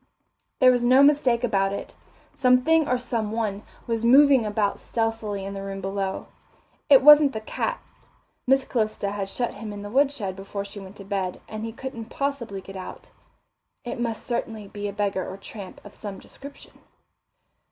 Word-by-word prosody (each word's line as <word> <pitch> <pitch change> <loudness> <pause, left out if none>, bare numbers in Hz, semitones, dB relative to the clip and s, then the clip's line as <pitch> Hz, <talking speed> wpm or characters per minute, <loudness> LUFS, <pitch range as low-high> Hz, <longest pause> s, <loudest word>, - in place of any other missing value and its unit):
There 255 -1 +6
was 245 -1 +1
no 255 +3 +6
mistake 275 -5 +3
about 195 -4 +1
it. - - -6 0.4
Something 280 +5 +3
or 250 - +2
some 235 -3 -3
person 210 -2 -2 0.2
was 230 -1 -2
moving 265 -1 +6
about 205 -1 0
stealthily 225 -3 -2
in 195 - -5
the 195 - -5
room 195 0 -5
below. 195 0 -3 0.6
It 275 -2 +7
wasn't 295 -1 +8
the 220 - -4
cat - - -3 0.7
Miss 270 0 +4
Calista 215 -4 -1
had 200 -1 -4
shut 240 +4 -2
him 210 +1 -7
in 205 0 -7
the 205 - -7
woodshed 265 -7 +1
before 200 +1 -6
she 200 +1 -9
went 195 0 -11
to 200 - -10
bed, 190 -2 -3
and 215 0 -6
he 225 - -4
couldn't 235 -1 -7
possibly 240 -6 -3
get 195 +1 -11
out. 185 -1 -9 0.7
It 240 - -5
must 230 -2 -3
certainly 225 -3 -3
be 205 +1 -5
a - - -3
beggar 200 -2 -1
or 190 - -7
tramp 195 -1 -9
of 205 - -11
some 205 -3 -7
description. 280 +7 -13
220 Hz, 175 wpm, -25 LUFS, 200-250 Hz, 0.7 s, wasn't